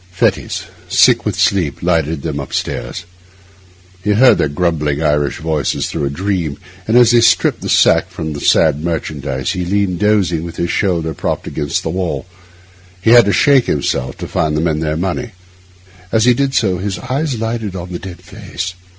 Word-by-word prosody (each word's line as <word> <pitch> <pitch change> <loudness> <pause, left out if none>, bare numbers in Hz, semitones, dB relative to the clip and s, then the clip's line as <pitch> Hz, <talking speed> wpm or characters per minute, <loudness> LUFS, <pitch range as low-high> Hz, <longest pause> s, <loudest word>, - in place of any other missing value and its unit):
Fettes, 90 - -1 0.3
sick - - +4
with - - -1
sleep, 90 -8 0
lighted 80 -4 0
them 75 -3 -3
upstairs. 70 +4 -4 1.0
He 105 +2 +2
heard 125 +5 +5
their - - +2
grumbling 75 -2 -1
Irish 75 -2 +1
voices 80 -3 -1
through 75 -3 -2
a - - -1
dream; 85 -2 -2 0.3
and 110 +2 +3
as 120 -2 +6
they 120 -1 +5
stripped - - +3
the - - -5
sack - - +4
from 80 -2 -5
their 70 - -6
sad 75 +2 +3
merchandise 75 -3 -3
he 90 -1 -3
leaned 95 -1 0
dozing, 95 -6 +1
with 85 -1 -7
his 85 - -2
shoulder 85 -5 0
propped - - -3
against 75 -2 -2
the 80 - -2
wall; 90 +1 -3 0.7
he 100 +5 +2
had 120 -1 +8
to 100 - +2
shake 135 +3 +4
himself 65 -3 -1
to - - -6
find 75 -1 -1
the - - 0
men 80 -2 0
their 80 -1 -1
money. 95 +7 -3 0.8
As 110 0 +2
he 125 - +6
did 135 +2 -1
so 95 -5 +1
his 95 -1 -3
eyes 135 - -2
lighted 110 -3 -3
on 90 0 -7
the 85 - -5
dead 95 -3 -10
face. 90 +2 -6
90 Hz, 185 wpm, -16 LUFS, 80-105 Hz, 1.0 s, had